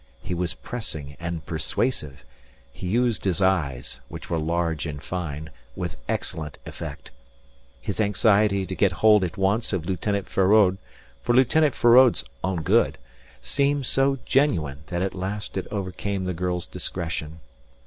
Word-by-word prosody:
He 95 - -3
was 85 -5 -1
pressing 75 - -5
and 85 -1 -4
persuasive. 75 - -2 0.5
He 90 - -6
used 120 +3 +1
his 95 -2 0
eyes, 70 -10 0
which - - -9
were 85 - +1
large 80 -1 -1
and 75 -1 -5
fine, 75 -3 -5 0.2
with 90 -2 -4
excellent 75 -2 -2
effect. - - -8 0.7
His - - -2
anxiety 105 -1 +3
to 95 - -5
get 95 -1 +2
hold 105 +2 +5
at 90 +2 -3
once 100 +4 +1
of 85 -4 -1
Lieutenant 95 +2 -1
Feraud, 95 -1 +4 0.4
for 120 - +1
Lieutenant 140 +3 +4
Feraud's 120 - +6 0.2
own 90 -3 -1
good, - - +3 0.4
seemed 140 - +1
so 135 +2 +3
genuine 85 - +1
that 90 +1 -1
at 95 - -2
last 100 +3 -4
it 95 - -3
overcame 100 0 -3
the 90 0 -2
girl's 90 0 -2
discretion. 80 -2 -4
95 Hz, 145 wpm, -25 LUFS, 80-105 Hz, 0.7 s, Feraud's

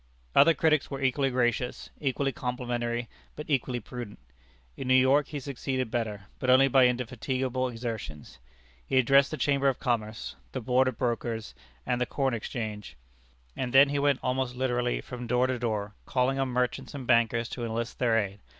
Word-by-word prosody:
Other 165 - +6
cities 155 -3 +3
were 135 - -5
equally 135 +1 +2
gracious, 125 -1 -1
equally 135 0 0
complimentary, 120 -1 -3 0.3
but 150 - -7
equally 130 -3 0
prudent. 120 -1 -8 0.6
In 130 - -6
New 130 - +5
York 130 +3 +4
he 145 - -5
succeeded 130 -2 -3
better, 110 -4 -2 0.2
but 130 - -1
only 130 +2 +7
by 130 -1 +5
indefatigable 130 +1 -1
exertions. 110 - -6 0.4
He 130 - -1
addressed 135 +2 +5
the 155 - -4
Chamber 140 -1 +2
of 130 - -2
Commerce, 115 -3 -2 0.2
the 130 - -2
Board 125 +2 +2
of 130 - -2
Brokers, 115 - -2 0.3
and 125 0 -1
the 125 - +1
Corn 135 -2 0
Exchange, 110 - -5 0.6
and 125 -2 -3
then 135 +1 +7
he 145 0 0
went 140 -2 +2
almost 125 -1 -1
literally 125 -1 0
from 125 -1 -7
door 125 +2 +2
to 130 -1 -1
door, 105 -3 -2
calling 135 +1 +1
on 135 - +1
merchants 125 +2 -2
and 135 -3 -6
bankers 115 -1 +3
to 120 - -5
enlist 115 +1 -3
their 115 -3 +3
aid. 100 -2 -2
125 Hz, 175 wpm, -28 LUFS, 120-135 Hz, 0.6 s, only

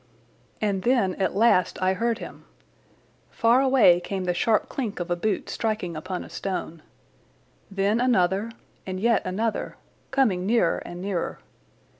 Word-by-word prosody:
And 200 -3 0
then 230 -4 +2
at 190 - 0
last 195 -5 +3
I 185 0 +2
heard 230 +4 0
him. - - -10 0.8
Far 235 +3 +3
away 255 -10 +5
came 190 +1 -4
the 180 -1 0
sharp 215 +5 +1
clink 230 -9 -4
of 175 0 -4
a - - +3
boot 200 +3 -2
striking 215 -7 -2
upon 180 +3 -5
a - - -12
stone. 180 -4 -4 0.9
Then 200 +3 +1
another 200 -3 +2 0.3
and 185 -1 -5
yet 230 +2 +3
another, 215 +5 -2 0.3
coming 215 -10 +1
nearer 225 -6 +2
and 175 +1 -8
nearer. 190 -4 -2
195 Hz, 145 wpm, -25 LUFS, 185-230 Hz, 0.9 s, away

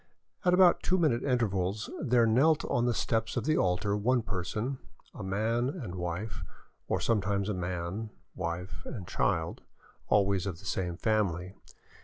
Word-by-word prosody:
At 180 -1 +4
about 180 -2 +6
two 185 - +2
minute 150 -9 +2
intervals 105 -6 0
there 125 -5 +4
knelt 140 +8 +4
on 120 - +1
the 120 - +2
steps 110 0 0
of - - 0
the 155 +1 +3
altar 90 +3 +1
one 120 +3 +2
person, 105 +6 -3 0.3
a - - -8
man 110 +6 0
and 135 - -5
wife, 90 +1 -4 0.5
or - - 0
sometimes 100 -2 +1
a - - 0
man, 90 +4 -3 0.2
wife, 90 +1 -4
and 95 -8 -7
child, - - 0 0.5
always 100 -2 +2
of 90 -4 -4
the 100 - -14
same 90 -2 -2
family. 95 -4 0
105 Hz, 155 wpm, -30 LUFS, 90-120 Hz, 0.5 s, about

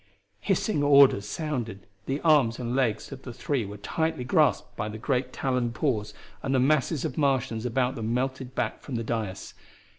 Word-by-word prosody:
Hissing 215 -10 0
orders 140 -7 +6
sounded, 120 - -4 0.2
the 135 +2 -1
arms 145 -8 +4
and 120 0 -3
legs 120 -4 0
of 135 -1 -8
the 130 - -8
three 125 0 -2
were 100 +1 -8
tightly 160 +6 -2
grasped 125 - +2
by 105 +1 -3
great 125 +4 -1
taloned 125 -3 -1
paws, 115 -8 -1 0.3
and 135 0 0
the - - +4
masses 150 +2 +2
of 150 -2 -3
Martians 125 -5 +1
about 125 +1 +1
them 115 0 -3
melted 130 +1 -2
back - - -2
from 130 - -6
the 115 - -2
dais. 110 -4 -4
125 Hz, 175 wpm, -27 LUFS, 115-140 Hz, 0.3 s, orders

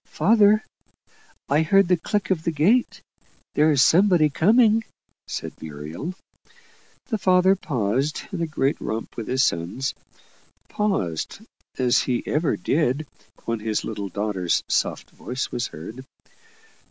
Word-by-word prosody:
"Father, 215 0 +4 0.8
I 145 +2 +2
hear 195 +5 +4
the 180 0 +2
click 200 +4 -2
of 165 -4 0
the - - 0
gate. 190 - +1 0.5
There's 150 -3 +4
somebody 175 -3 +4
coming," 220 - +4 0.4
said - - -5
Muriel. 80 - -6 0.9
The 220 -3 -1
father 185 0 +4
paused 135 - -1
in 185 -4 -4
a 165 - 0
great 140 -2 -1
romp 110 +1 -4
with 115 - -6
his 130 +1 +2
sons 90 +9 -1 0.8
paused, 100 - -2 0.4
as 125 -2 +3
he 125 -2 -1
ever 150 -8 0
did 145 - 0 0.4
when 115 -1 -2
his 110 0 -2
little 100 -3 -5
daughter's 95 -3 -1
soft - - -1
voice 130 +2 -5
was 120 - -2
heard. 110 +12 -9
150 Hz, 130 wpm, -23 LUFS, 110-185 Hz, 0.9 s, Father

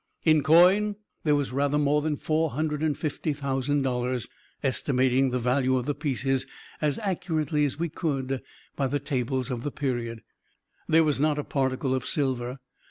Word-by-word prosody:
In 155 -2 +5
coin, 180 +7 +5 0.3
there 150 -2 +3
was 145 -3 -1
rather 140 +2 +1
more 150 0 +2
than 150 -1 -1
four 160 +2 0
hundred 150 +1 -2
and 155 -2 0
fifty 155 0 -2
thousand 140 0 -1
dollars 125 -2 -1 0.4
estimating 130 0 +2
the 125 - -1
value 130 +2 +2
of 125 - -2
the 145 - 0
pieces, 135 -2 -1 0.3
as 150 -2 +1
accurately 160 -7 0
as 140 - -3
we 170 +2 -1
could, 135 -5 -2 0.3
by 135 - 0
the 145 - 0
tables 130 -1 -2
of 120 -2 -3
the 145 - -2
period. 120 -5 -3 0.6
There 160 +1 +5
was 150 -3 +1
not 150 0 +2
a 150 - -1
particle 130 -1 -1
of 130 -2 -2
silver. 130 -3 -1
140 Hz, 170 wpm, -27 LUFS, 130-150 Hz, 0.6 s, In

